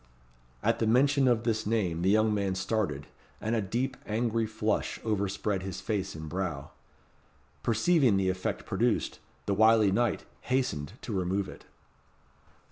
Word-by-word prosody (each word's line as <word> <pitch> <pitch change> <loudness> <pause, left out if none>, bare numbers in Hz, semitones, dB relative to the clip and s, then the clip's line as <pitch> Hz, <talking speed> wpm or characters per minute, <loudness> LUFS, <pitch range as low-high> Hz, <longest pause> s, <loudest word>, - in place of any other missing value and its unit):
At - - +2
the 115 - +1
mention 135 +4 +4
of 120 -2 +3
this 110 -2 0
name 95 -7 0
the 95 - +2
young 110 +1 +4
man 100 -2 0
started, 95 -7 -1 0.3
and 110 +2 -1
a 110 - +1
deep 125 +7 -2
angry 115 +1 0
flush 110 0 -1
overspread 100 -2 -1
his 95 -1 -5
face 95 -2 -2
and 80 0 -7
brow. 80 -4 -4 0.9
Perceiving 120 - +3
the 95 -1 +1
effect 95 0 -2
produced, - - 0 0.3
the 100 - +1
wily 110 0 +5
knight 120 +1 0 0.2
hastened 125 - -1
to 115 - -4
remove 95 +1 0
it. - - -11
105 Hz, 145 wpm, -29 LUFS, 95-115 Hz, 0.9 s, wily